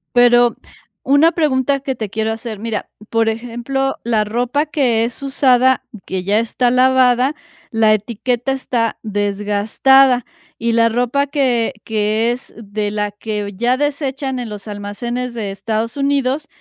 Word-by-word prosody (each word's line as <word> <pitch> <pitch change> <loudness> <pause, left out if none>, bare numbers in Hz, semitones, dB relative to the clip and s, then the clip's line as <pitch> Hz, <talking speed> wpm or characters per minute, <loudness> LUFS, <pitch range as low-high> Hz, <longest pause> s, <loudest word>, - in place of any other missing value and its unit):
Pero, 240 0 +5 0.5
una 285 +5 +4
pregunta 280 -4 +1
que 265 -1 -3
te 215 -3 -4
quiero 220 +1 -1
hacer, 225 -2 -6
mira, 225 -2 -4 0.2
por 225 -1 +2
ejemplo, 245 +4 -2
la 225 -2 +1
ropa 245 +7 0
que 250 -7 +1
es 245 +3 -6
usada, 260 -1 +3 0.2
que 185 -1 -3
ya 205 +3 +2
está 240 +2 0
lavada, 255 +1 +3 0.4
la 220 -1 +4
etiqueta 235 +4 -1
está 240 -4 -1
desgastada, 210 +5 +2 0.3
y 230 0 -1
la 230 0 +4
ropa 245 +5 0
que 255 -5 +1
que 220 +1 +1
es 250 +2 -7
de 210 -1 -4
la 210 -1 -2
que 205 -1 -5
ya 240 +4 +1
desechan 275 -2 -2
en 235 -3 -5
los 210 +1 -8
almacenes 235 +5 -4
de 210 -4 -4
Estados 220 +4 -3
Unidos, 280 +1 0
235 Hz, 145 wpm, -18 LUFS, 215-260 Hz, 0.5 s, Pero